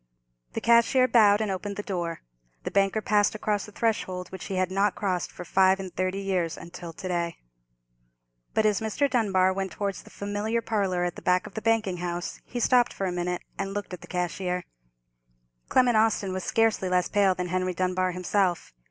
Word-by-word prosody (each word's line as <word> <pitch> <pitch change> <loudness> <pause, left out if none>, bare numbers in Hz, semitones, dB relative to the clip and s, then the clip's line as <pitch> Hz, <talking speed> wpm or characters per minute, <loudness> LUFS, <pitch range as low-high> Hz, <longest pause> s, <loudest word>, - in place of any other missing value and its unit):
The - - -3
cashier 235 +2 +5
bowed 210 -4 +5
and 215 -2 0
opened 200 +2 -4
the 205 - -4
door. 175 -4 -3 0.4
The - - -4
banker 200 +2 +2
passed 205 +1 +2
across 210 -1 -1
the - - -11
threshold, 190 -5 -1
which 190 - -8
he 195 - -4
had 185 0 0
not 195 +1 +2
crossed 185 -4 -1
for 180 - -9
five 190 +2 +4
and 190 -2 -7
thirty 185 +1 -1
years 185 -4 -1
until 170 0 -9
to 185 - -7
day. 170 -2 -2 1.2
But 220 - +3
as 210 0 +2
Mr. 220 +6 +1
Dunbar 190 -7 +2
went 190 -1 -3
towards 200 -2 -3
the - - -16
familiar 205 +3 -2
parlour 195 -5 0
at 175 -1 -2
the - - -8
back 180 0 +2
of - - -10
the 220 - -4
banking 220 -5 +1
house, 175 0 -4
he 245 - -5
stopped 245 0 +3
for 195 - -3
a 185 - -1
minute, 180 0 -2 0.2
and 195 0 -3
looked 205 -2 -4
at 180 - -7
the - - -12
cashier. 180 0 -2 1.1
Clement 250 -2 +4
Austin 215 -3 +2
was 185 0 -3
scarcely 225 -4 +1
less 180 -1 +2
pale 195 -2 +3
than 180 0 -3
Henry 185 0 -1
Dunbar 185 0 0
himself. 180 - 0
190 Hz, 195 wpm, -27 LUFS, 180-210 Hz, 1.2 s, cashier